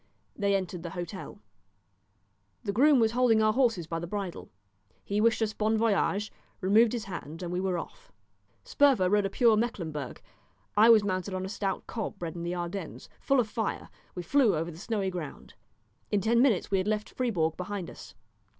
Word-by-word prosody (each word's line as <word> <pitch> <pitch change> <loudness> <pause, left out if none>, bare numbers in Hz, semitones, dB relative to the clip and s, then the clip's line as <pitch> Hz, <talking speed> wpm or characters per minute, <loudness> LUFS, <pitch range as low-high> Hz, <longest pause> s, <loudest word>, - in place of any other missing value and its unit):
They 200 -1 +1
entered 185 -2 -3
the 170 - -6
hotel. 175 +2 -6 1.3
The 200 - -1
groom 275 +4 +5
was 225 -1 +3
holding 240 -2 +3
our 215 0 +3
horses 230 -9 +1
by 165 +1 -3
the 170 - -5
bridle. 195 -2 -5 0.5
He 205 +1 -1
wished 225 0 +3
us 215 -1 -1
bon 220 +1 +1
voyage, 210 -1 +1 0.3
removed 215 +5 +4
his 235 -3 -2
hand, 170 -3 -7
and 175 0 -4
we 180 - -1
were 190 -2 0
off. - - -9 0.5
Sperver 260 -11 +3
rode 205 -1 +3
a - - -7
pure 230 +2 +4
Mecklemburg. 165 - -3 0.6
I 215 +3 +6
was 220 -3 +7
mounted 185 -1 -2
on 185 0 -3
a - - -5
stout 195 -2 -3
cob 220 -3 -5
bred 165 -2 -5
in 170 - -5
the 175 +1 -3
Ardennes, 175 0 -6
full 275 -1 +2
of 235 - +2
fire; 220 0 -3 0.3
we 180 - -4
flew 240 +2 +3
over 165 +2 -2
the 160 - -12
snowy 200 -2 -2
ground. 170 -6 -7 0.6
In 205 - +2
ten 230 +4 +3
minutes 235 -9 +2
we 195 - +3
had 185 - -2
left 215 0 -1
Fribourg 175 -11 0
behind 185 -1 -5
us. 95 - -12
200 Hz, 190 wpm, -29 LUFS, 180-225 Hz, 1.3 s, was